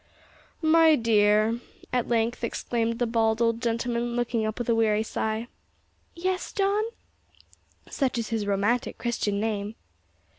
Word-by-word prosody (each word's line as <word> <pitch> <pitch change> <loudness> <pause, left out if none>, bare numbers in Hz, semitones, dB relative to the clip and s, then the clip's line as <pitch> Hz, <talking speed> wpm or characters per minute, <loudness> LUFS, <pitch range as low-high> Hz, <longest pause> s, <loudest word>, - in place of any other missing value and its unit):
"My 320 0 +6
dear," 215 -1 +3 0.3
at 250 -2 +1
length 235 0 0
exclaimed 230 0 -1
the 245 - +1
bald 225 -1 +1
old 230 -1 +1
gentleman, 235 0 -1
looking 235 -2 0
up 215 - -4
with 240 - -3
a 235 - +3
weary 220 -1 +2
sigh. 220 +1 -2 0.7
"Yes, 370 +2 -2
John?" 405 +2 +1 1.0
(Such 265 -4 -1
is 230 -2 -2
his 220 -3 -2
romantic 205 +5 0
Christian 215 -4 -1
name!) 210 0 -2
230 Hz, 135 wpm, -26 LUFS, 220-240 Hz, 1.0 s, My